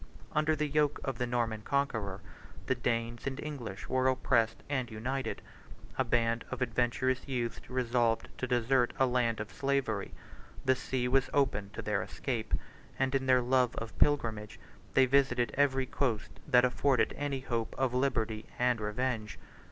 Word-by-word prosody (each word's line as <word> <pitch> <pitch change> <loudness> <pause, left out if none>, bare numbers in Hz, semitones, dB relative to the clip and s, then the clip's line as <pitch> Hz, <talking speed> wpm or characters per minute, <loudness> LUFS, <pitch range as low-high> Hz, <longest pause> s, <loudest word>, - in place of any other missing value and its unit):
Under 155 +1 +2
the 150 0 0
yoke 150 0 +1
of 135 -3 -3
the 125 - 0
Norman 115 -3 -1
conqueror, 110 -8 -1 0.4
the - - +2
Danes 120 0 -2
and 135 0 -3
English 125 -10 -6
were 130 0 +2
oppressed 115 -3 +2
and 130 -4 -1
united; 125 +5 -3 0.5
a - - +2
band 115 -1 +1
of 130 - -4
adventurous 125 +2 0
youths 120 -4 -3
resolved 120 -2 +1
to 130 - -1
desert 125 0 +2
a 135 - +4
land 125 -3 +1
of 105 0 -5
slavery; 135 -7 -1 0.5
the 130 - +5
sea 125 0 -2
was 135 +1 +3
open 130 -8 +1
to - - -5
their 105 -1 0
escape; 110 -2 -2 0.4
and, 135 0 +1
in 135 -1 0
their 130 -1 +5
long 125 0 +3 0.3
pilgrimage, 115 -8 +1 0.4
they 130 - +7
visited 130 -2 +2
every 135 -1 +3
coast 120 -5 -1 0.2
that 125 -3 +6
afforded 125 0 +2
any 140 -2 -2
hope 115 -3 -2
of 130 -2 +1
liberty 115 -4 0
and 125 -2 +2
revenge. 110 0 -2
125 Hz, 155 wpm, -31 LUFS, 115-135 Hz, 0.5 s, they